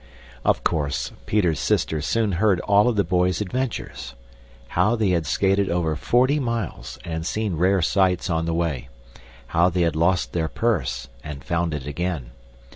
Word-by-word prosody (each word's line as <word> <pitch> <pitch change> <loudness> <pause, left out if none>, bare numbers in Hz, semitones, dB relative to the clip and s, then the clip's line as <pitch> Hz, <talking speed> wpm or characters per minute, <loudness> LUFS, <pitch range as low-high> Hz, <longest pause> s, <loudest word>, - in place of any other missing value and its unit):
Of - - +2
course, 70 -6 -1 0.2
Peter's 90 -8 +2
sister 80 -1 0
soon 110 +7 +1
heard 95 0 +2
all 100 +2 +4
of 120 - +2
the 100 - +3
boys' 90 0 +1
adventures. 105 - -4 0.5
How 105 +7 +2
they 110 -4 +1
had 85 -4 0
skated 95 +7 +2
over 85 -2 0
forty 130 - +2
miles 115 -4 -3
and 80 -1 -3
seen 105 +2 -1
rare 90 +2 +2
sights 95 +1 +2
on 80 -2 0
the 85 - 0
way; 75 -7 -2 0.6
how 85 +2 +3
they 90 0 -1
had 85 -2 +1
lost 85 +3 +1
their 80 -2 0
purse 70 - -1 0.2
and 75 -3 -7
found 85 -1 -1
it 70 -3 -6
again. 75 -4 -3
85 Hz, 165 wpm, -23 LUFS, 80-100 Hz, 0.6 s, all